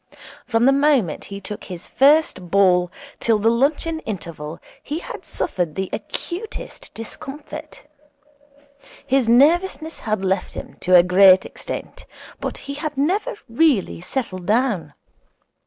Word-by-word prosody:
From 230 -1 +2
the 270 - +6
moment 275 - +2
he 200 0 -7
took 205 +1 -7
his 180 -2 -8
first 275 - +3
ball 180 -2 +4 0.3
till 225 -2 +2
the 220 +2 +3
luncheon 295 +6 +1
interval 170 - -6 0.2
he 295 - -4
had 345 - -7
suffered 175 - -2
the 190 -1 -3
acutest 435 +6 -6
discomfort. 295 +6 -8 1.2
His 260 -3 +2
nervousness 320 +6 +3
had 215 -3 -2
left 190 0 -1
him - - -8
to 180 0 +3
a 175 - +8
great 185 +1 +6
extent, - - -7 0.3
but - - -4
he 280 - -4
had 295 0 -5
never 395 - 0
really 240 - +2
settled 185 -4 -4
down. 210 - 0
230 Hz, 130 wpm, -21 LUFS, 185-295 Hz, 1.2 s, a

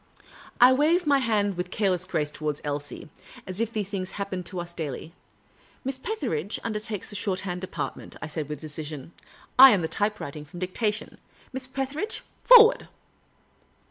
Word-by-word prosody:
I 250 +2 +8
waved 320 +6 +3
ni}^ 280 -2 +4
hand 205 -5 +1
with 180 +1 -3
careless 185 -3 0
grace 150 -4 -1
towards 150 -1 -3
Elsie 145 +3 -5 0.2
— - - -16
as 185 +3 -4
if 230 -1 -1
these 210 -4 -2
things 190 -2 -4
happened 190 -3 -4
to 185 -1 -5
us 175 0 -6
daily. 160 0 -5 0.2
' 100 0 -35
' - - -31
Miss 265 0 -3
Petheridge 235 - -3
under 215 -2 -2
takes 210 -2 -3
the - - -7
shorthand 185 -3 -2
department," 185 - -5
I - - -5
said, 150 -1 -5
with 150 -2 -5
decision. 155 -1 -6 0.2
" - - -24
I 265 +1 +13
am 200 -8 +3
the - - 0
typewriting 205 -8 -3
from 175 +4 -11
dictation. 210 +4 -2 0.3
Miss 260 0 -4
Petheridge, 270 - -4 0.2
for - - +11
ward 455 +2 +1
195 Hz, 180 wpm, -26 LUFS, 160-240 Hz, 0.3 s, I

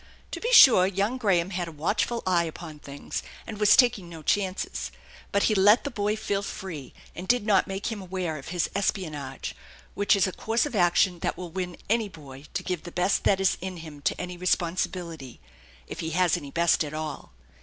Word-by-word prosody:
To - - -4
be 475 - -1
sure, 240 - +8
young 200 +6 -1
Graham 190 -5 +2
had 175 -2 -2
a - - -7
watchful 170 +9 -1
<eye 175 -2 +2
upon 160 -1 -8
things, 140 -1 -6 0.2
and 210 -2 -7
was 210 0 +6
taking 235 -9 +3
no 165 -2 -10
chances; 195 0 -1 0.4
but 200 - +2
he 220 - +3
let 205 +3 +5
the 285 - -4
boy 210 -2 0
feel 200 -2 -2
free, 170 -9 -7 0.2
and 180 +2 -8
did 245 -2 +2
not 200 -4 +3
make 195 +3 -3
him 215 -3 -5
aware 180 -4 -3
of 135 - -11
his 175 0 -1
espionage, 155 -9 -3 0.4
which 205 +1 +3
is 195 - +3
a 185 - -2
course 225 +7 0
of 295 - -5
action 175 -1 +3
that - - -2
will 180 -2 -7
win 180 -1 -4
any 220 -1 +1
boy 145 -5 -12
to - - -1
give 180 -3 -3
the 175 - -9
best 180 +3 +1
that 195 - +4
is 195 -1 +2
in 185 0 -5
him 150 -2 -11
to - - -1
any 180 0 -5
responsibility, 170 -5 -2 0.5
if - - -8
he 160 - -3
has 175 +1 +2
any 145 -5 -6
best 170 +2 +2
at 150 0 -6
all. 155 -2 -6
185 Hz, 210 wpm, -26 LUFS, 165-200 Hz, 0.5 s, sure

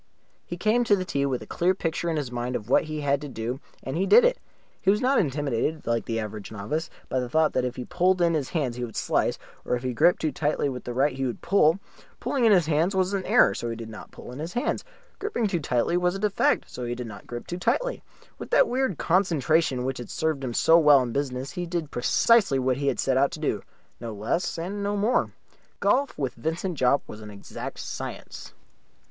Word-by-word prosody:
He 175 - -5
came 215 +6 +2
to 205 - +5
the 185 -2 -3
tee 140 -4 0
with 130 -2 -2
a - - -11
clear 180 +2 +1
picture 170 -1 -2
in 160 - -1
his 140 -5 -3
mind 120 +1 -3
of 105 - -4
what - - +4
he 155 -1 -4
had 140 0 +1
to 145 - -6
do, 120 +1 -4 0.2
and 135 - -4
he 190 +4 0
did 480 +2 +7
it. - - +2 0.4
He 190 - +1
was 205 +2 +4
not 265 +2 +3
intimidated, 145 - -1
like 115 0 0
the 115 -1 -2
average 105 -1 -6
novice, 110 +11 -3 0.2
by 130 - -1
the 125 -1 -3
thought 160 +4 +2
that 130 - +1
if 125 0 -3
he 125 - -5
pulled 180 +1 +2
in 170 -1 +3
his 150 -5 -1
hands 135 -8 -2
he 125 - -3
would 115 -3 -6
slice, - - 0 0.3
or - - 0
if 120 - -5
he 130 -1 -1
gripped 175 +9 +4
too 155 - 0
tightly 145 +1 0
with 125 -2 -6
the 120 - -4
right 135 +2 +2
he 135 - -3
would 120 - -6
pull. 170 -3 +4 0.4
Pulling 255 -4 0
in 225 - +6
the 190 -3 +6
hands 165 +4 +1
was 190 +1 +1
an 195 -1 -1
error, - - +5
so 120 - -4
he 115 - -3
did 115 -1 -8
not 110 - -10
pull - - -11
in 125 - -8
his 165 +3 -5
hands. 245 - -1 0.4
Gripping 400 - -1
too 190 -4 0
tightly 125 +3 +1
was 180 +1 +1
a - - -4
defect, 210 -1 +1
so 125 - -7
he 120 0 -2
did 125 0 -5
not 100 -3 -10
grip 120 0 -6
too 175 - -5
tightly. - - 0 0.4
With - - -7
that - - +5
weird 255 - 0
concentration 160 -7 +2
which 130 -1 -2
had 120 - -7
served 155 -3 -1
him 120 -3 -3
so 165 +1 +6
well 145 -4 +6
in 120 - -4
business 135 0 -3
he 180 -2 -4
did 170 -3 -3
precisely 200 - +3
what 130 0 +1
he 140 0 -2
had - - 0
set 130 -1 +2
out 140 +1 +4
to 160 - -6
do 110 -10 -1 0.4
no 115 -2 -6
less 115 - -1
and 190 +5 -4
no 205 +1 -1
more. 215 +5 +2 0.5
Golf 275 +1 +1
with 135 -4 -2
Vincent 165 +5 -3
Jopp 130 +2 +3
was 105 - -9
an 105 - -9
exact 100 -1 -8
science. - - -7
150 Hz, 245 wpm, -26 LUFS, 125-180 Hz, 0.5 s, did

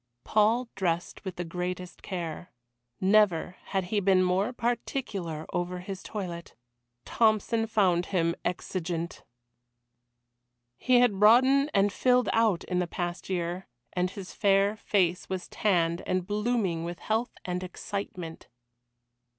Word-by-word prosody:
Paul 225 +4 +2
dressed 175 -2 -2
with 190 -3 -5
the 175 - -3
greatest 180 +1 -5
care; 175 -2 -5 0.5
never 190 -3 +3
had 195 -1 -1
he 210 - +3
been 190 -1 +4
more 185 +5 +1
particular 225 - -3
over 175 +1 -2
his 185 +1 -6
toilet. 175 -5 -6 0.5
Tompson 225 0 +2
found 185 -5 +2
him 170 -3 +1
exigeant! 175 -1 -3 1.6
He 250 -1 +4
had 215 -6 +3
broadened 260 +7 +6
and 200 0 +3
filled 250 -2 +3
out 220 -6 +2
in 180 -1 -1
the 180 - 0
past 175 +2 -4
year, 175 0 -2 0.3
and 180 0 0
his 190 -1 -9
fair 200 +1 +3
face 185 -4 0
was 185 -1 -3
tanned, 170 -4 +1
and 185 -1 0
blooming 210 -5 0
with 170 0 -5
health 220 - -2
and 180 0 -2
excitement. 180 -3 -6
185 Hz, 125 wpm, -28 LUFS, 175-215 Hz, 1.6 s, broadened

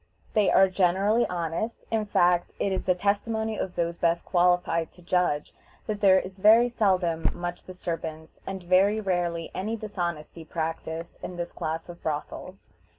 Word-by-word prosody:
They 210 -3 +3
are 195 - +6
generally 195 +5 +2
honest; 175 +6 -3
in 220 -2 0
fact, 175 -3 +2
it 200 - 0
is 190 - -2
the 180 - +3
testimony 220 +3 0
of 185 - -3
those 170 0 -1
best 170 0 +1
qualified 175 -2 +2
to 180 - -18
judge, 175 -4 0 0.3
that 210 -2 -3
there 190 -2 +6
is 185 +1 -8
very 225 +4 +6
seldom 185 -8 +1
much 175 0 -5
disturbance, 165 -3 -6
and 190 -1 -5
very 190 +4 +3
rarely 175 -4 -1
any 215 +4 -2
dishonesty 175 -7 -5
practiced 165 +1 -4
in 180 - -6
this 175 0 -4
class 160 +1 -4
of 175 0 -11
brothels. 160 +5 -5
180 Hz, 155 wpm, -27 LUFS, 170-200 Hz, 0.3 s, are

